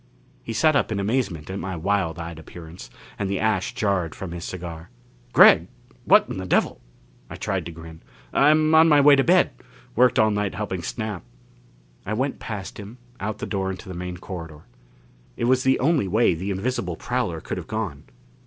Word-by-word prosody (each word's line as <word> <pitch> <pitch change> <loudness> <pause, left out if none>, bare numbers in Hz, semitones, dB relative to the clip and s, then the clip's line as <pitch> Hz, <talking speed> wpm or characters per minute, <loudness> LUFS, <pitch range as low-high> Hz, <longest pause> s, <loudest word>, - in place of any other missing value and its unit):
He - - -7
sat 155 +6 +3
up 135 - +1
in 105 - -1
amazement 100 - -1
at 95 - -4
my 95 -1 -4
wild 85 -1 -1
eyed 85 -1 -7
appearance, 80 +2 -11 0.3
and 100 - -1
the 100 - -1
ash 110 0 0
jarred 100 -8 0
from 95 -3 -7
his 85 0 -6
cigar. 85 -3 -7 0.4
"Gregg! - - +7 0.4
What - - +6
in - - -5
the 95 -1 -5
devil - - +1 0.2
" - - -31
I - - -7
tried - - -3
to - - -6
grin. 80 0 -11 0.3
"I'm 155 +2 +4
on 160 +1 +7
my 150 -2 +6
way 145 0 +7
to 135 - +3
bed 180 +4 +4 0.4
worked 125 +1 +4
all 110 0 +4
night 105 -1 -1
helping 95 -4 -3
Snap." 105 -1 -4 0.8
I 110 - -3
went 135 +4 -2
past 105 -3 -6
him, 105 +4 -9 0.2
out 110 +1 -3
the - - -5
door 95 -2 -2
into 95 +2 -7
the 95 - -6
main 90 0 -5
corridor. 80 -4 -8 0.8
It - - -1
was 130 +1 +3
the 130 0 +3
only 145 - +2
way 110 +1 +3
the 90 +5 -4
invisible 95 -3 -2
prowler - - -2
could - - -5
have - - -7
gone. 100 -10 -4
100 Hz, 195 wpm, -24 LUFS, 85-120 Hz, 0.8 s, Gregg